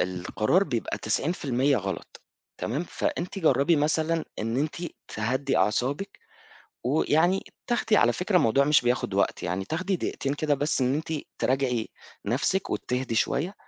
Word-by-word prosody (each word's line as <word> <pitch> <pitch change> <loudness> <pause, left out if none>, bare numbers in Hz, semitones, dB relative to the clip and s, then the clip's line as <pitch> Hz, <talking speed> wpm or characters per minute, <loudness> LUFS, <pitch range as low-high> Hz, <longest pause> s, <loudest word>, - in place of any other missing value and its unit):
القرار 95 - +1
بيبقى 120 - -2
90% 135 - +1
غلط، 95 -3 -5 0.4
تمام؟ 140 +10 -2
فأنتِ 180 +3 -2
جربي 155 -1 +3
مثلًا 155 +2 +1
إن 115 +3 -1
أنتِ 150 +3 0 0.3
تهدّي 130 +5 -1
أعصابِك، 130 - 0 0.7
ويعني 160 +7 +2 0.2
تاخدي 225 -3 +2
على 120 -8 +5
فكرة 180 - 0
الموضوع 135 -2 +4
مش 150 +1 +5
بياخد 120 +1 0
وقت - - +1
يعني 90 +3 -2
تاخدي 185 - -1
دقيقتين 140 -4 -2
كده 145 0 +1
بس 145 0 0
إن 130 +1 +2
أنتِ 160 +2 -3 0.3
تراجعي 125 -4 0 0.4
نَفسِك، 140 - 0
وتهدِي 125 -1 -2
شوية 160 - 0
140 Hz, 135 wpm, -27 LUFS, 120-165 Hz, 0.7 s, على